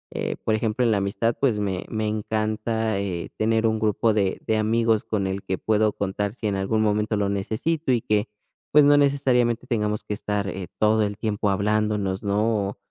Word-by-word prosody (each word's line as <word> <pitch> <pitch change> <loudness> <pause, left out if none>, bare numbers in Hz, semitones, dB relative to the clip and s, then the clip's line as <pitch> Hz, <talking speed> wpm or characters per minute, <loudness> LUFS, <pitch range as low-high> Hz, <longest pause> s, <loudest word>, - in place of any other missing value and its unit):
eh, - - -2
por 110 - +1
ejemplo, 110 +2 0
en 115 - +3
la 105 - +2
amistad, 100 +4 0
pues 125 -7 +2
me 95 -3 -2
me 110 -1 -2
encanta, 110 0 -1
eh, 90 -4 -3
tener 110 +1 +1
un 110 -1 +1
grupo 110 +1 +2
de 100 -3 0
de 110 - +1
amigos 110 0 +2
con 105 -3 -2
el 95 +1 -3
que 95 - -2
puedo 110 +1 +2
contar 100 +1 -2
si 120 - -8
en 105 - +1
algún 105 +3 0
momento 105 0 +1
lo 100 -1 0
necesito 110 +10 -1
y 120 -2 +2
que, 105 -1 0 0.4
pues, 150 0 +6
no 145 0 +6
necesariamente 130 -4 +2
tengamos 105 -4 -1
que - - -4
estar, 105 -1 -2
eh, 95 -1 -5
todo 110 +1 +3
el 105 -1 -3
tiempo 105 -1 -1
hablándonos, 105 -1 0
¿no?, 105 0 +1
o - - -9
110 Hz, 200 wpm, -24 LUFS, 100-110 Hz, 0.4 s, pues